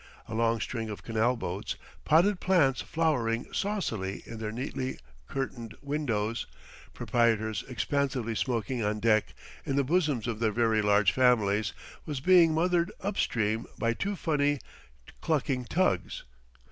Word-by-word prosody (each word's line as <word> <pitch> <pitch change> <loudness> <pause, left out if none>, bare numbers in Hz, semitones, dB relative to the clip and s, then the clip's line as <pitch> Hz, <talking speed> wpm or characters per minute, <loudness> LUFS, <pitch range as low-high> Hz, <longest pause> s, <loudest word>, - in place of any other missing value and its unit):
A - - -7
long 115 0 +1
string 115 -1 -3
of 105 - -7
canal 115 +2 +1
boats, - - -4 0.3
potted 180 +5 +4
plants 165 -8 +3
flowering 125 -8 0
saucily 115 - -2
in 115 -1 -8
their 110 -1 -3
neatly 130 +2 -4 0.3
curtained 120 -5 -4
windows, 120 -7 -1 0.5
proprietors 110 -3 +1
expansively 130 -3 -1
smoking 120 +1 -1
on 105 +1 0
deck, 110 -1 +2 0.3
in 135 - -2
the 140 - +3
bosoms 150 -5 +1
of 115 -3 -3
their 110 -2 +2
very 115 -1 +2
large 105 -1 +4
families, 110 -5 +3 0.4
was 145 -4 -3
being 175 +2 +6
mothered 175 +2 +2
up 200 +1 -2
stream 110 0 0
by 115 0 +1
two 200 - -2
funny, 145 -4 +1 0.6
clucking 135 -5 0
tugs. 95 - 0
120 Hz, 135 wpm, -29 LUFS, 110-150 Hz, 0.6 s, being